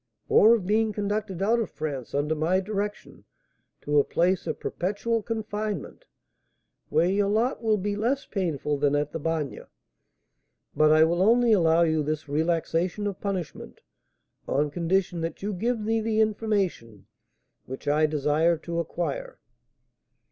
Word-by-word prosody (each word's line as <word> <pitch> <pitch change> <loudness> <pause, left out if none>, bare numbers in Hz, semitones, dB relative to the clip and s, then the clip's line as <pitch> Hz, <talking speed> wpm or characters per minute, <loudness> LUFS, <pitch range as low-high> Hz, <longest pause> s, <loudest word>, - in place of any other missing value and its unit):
"Or 225 +2 +7
of 205 -6 -4
being 215 +2 +1
conducted 205 -2 -2
out 230 +4 +3
of 225 - -2
France, 140 -5 -5
under 145 +2 +1
my 160 +4 +1
direction, 205 +1 -5 0.6
to 145 0 +2
a - - +4
place 180 +5 0
of - - -3
perpetual 210 +5 -2
confinement, 215 - -4 0.8
where 170 - +3
your 200 +2 +1
lot 225 +6 0
will 220 -2 +2
be 205 +1 -2
less 245 +7 -1
painful 150 -7 -2
than 145 0 +2
at 145 0 -1
the 165 - -4
Bagne; 160 -2 -2 1.1
but 155 0 +4
I 155 0 +6
will 170 +2 +1
only 235 +3 +4
allow 165 -3 +4
you 160 -2 +1
this 150 +1 -3
relaxation 165 +5 -1
of 200 -2 -4
punishment 190 -6 -5 0.7
on 145 +2 0
condition 175 +1 0
that 165 +3 -5
you 205 +1 -2
give 230 +5 -1
me 225 +1 0
the 220 0 0
information 200 - -1 0.6
which 130 +2 -8
I 150 +2 +3
desire 150 +3 +1
to 170 +1 -4
acquire. - - -4
185 Hz, 150 wpm, -26 LUFS, 155-215 Hz, 1.1 s, Or